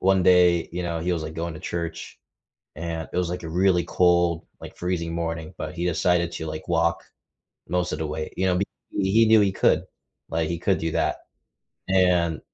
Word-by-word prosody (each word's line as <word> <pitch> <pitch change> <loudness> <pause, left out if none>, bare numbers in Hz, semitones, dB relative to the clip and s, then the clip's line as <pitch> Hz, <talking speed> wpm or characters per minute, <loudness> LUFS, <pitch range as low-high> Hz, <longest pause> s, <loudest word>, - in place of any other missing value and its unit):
one 95 0 +3
day, 90 -2 +5
you 90 +1 -4
know, 85 -1 -2
he 90 +2 0
was, 80 - -3
like, 80 - -6
going 85 0 -4
to - - -8
church 85 -1 -5 0.6
and 80 +1 -4
it - - -2
was, 90 -2 0
like, 90 0 -4
a 80 - -5
really 90 +1 +3
cold, 85 -2 +2
like, - - -10
freezing 85 -2 -2
morning, 85 0 -3
but - - -5
he 85 0 -2
decided 90 -1 +1
to, 80 - -5
like, 80 0 -6
walk 85 -1 +1 0.7
most 90 +1 0
of 75 - -3
the 80 - -2
way, 75 +1 -4
you 95 - 0
know, 90 -1 +2 0.3
he 100 +4 +3
knew 110 0 +7
he 100 -1 +2
could, - - +3 0.5
like, 80 0 -1
he 85 - -2
could 95 +2 +1
do 80 0 -2
that. - - 0 0.7
And 90 -4 +3
85 Hz, 200 wpm, -24 LUFS, 80-90 Hz, 0.7 s, knew